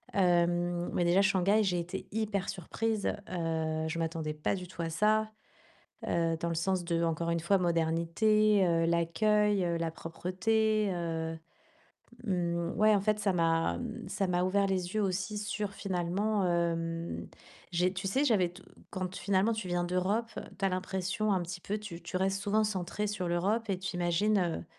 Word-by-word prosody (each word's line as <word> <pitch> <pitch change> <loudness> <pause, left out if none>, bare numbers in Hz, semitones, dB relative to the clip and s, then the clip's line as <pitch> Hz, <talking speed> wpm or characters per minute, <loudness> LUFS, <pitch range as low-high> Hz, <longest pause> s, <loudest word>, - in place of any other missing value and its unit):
Heu, 175 -1 +2
mais 175 - +1
déjà 175 +3 +4
Shanghai, 200 +1 +3
j'ai 180 -3 +1
été 180 +3 -5
hyper 210 -3 -1
surprise, 215 +4 -2 0.2
heu, 160 -2 -1
je 165 - -3
m'attendais 160 -2 -2
pas 150 +5 -1
du 180 -2 -7
tout 175 -1 -7
à 165 - -2
ça, 215 +5 +2 0.8
heu, 165 -1 +1
dans 170 - 0
le 165 - -2
sens 180 +2 0
de, 170 -1 0
encore 165 0 0
une 170 0 +1
fois, 170 +4 +3
modernité, 180 +5 +2
heu, 165 -1 +2
l'accueil, 205 +4 +2
heu, 170 -1 0
la 165 -1 -2
propreté. 210 +6 0
Heu, 165 -2 -3 0.9
mmh 170 -4 -1
ouais, 215 0 +5
en 200 - +3
fait, 210 +1 +1
ça 205 -2 +1
m'a 165 - +1 0.3
ça 195 - -1
m'a 180 0 +1
ouvert 200 +2 +2
les 185 -1 -1
yeux 215 - +2
aussi 190 +2 -1
sur 210 -1 -3
finalement, 195 +2 -1
hem, 170 -1 -1 0.5
j'ai 180 +1 +2
tu 190 +1 -4
sais, 265 +9 +1
j'avais 200 -10 +3
t 180 +2 -14 0.3
quand 185 -1 -4
finalement 200 +3 +2
tu 220 -4 -4
viens 175 0 0
d'Europe, 185 +6 0 0.3
tu - - -2
as - - +4
l'impression 190 +3 -1
un 185 -2 +1
petit 175 +1 -6
peu 205 +4 -2
tu 200 -5 -8
tu - - -5
restes 195 +1 0
souvent 205 +2 +2
centrée 210 0 -2
sur 195 -3 -3
l'Europe 200 +7 0
et 190 -2 0
tu 185 -1 -4
imagines, 175 +4 +2
heu, 175 -2 -1
185 Hz, 175 wpm, -31 LUFS, 170-205 Hz, 0.9 s, ouais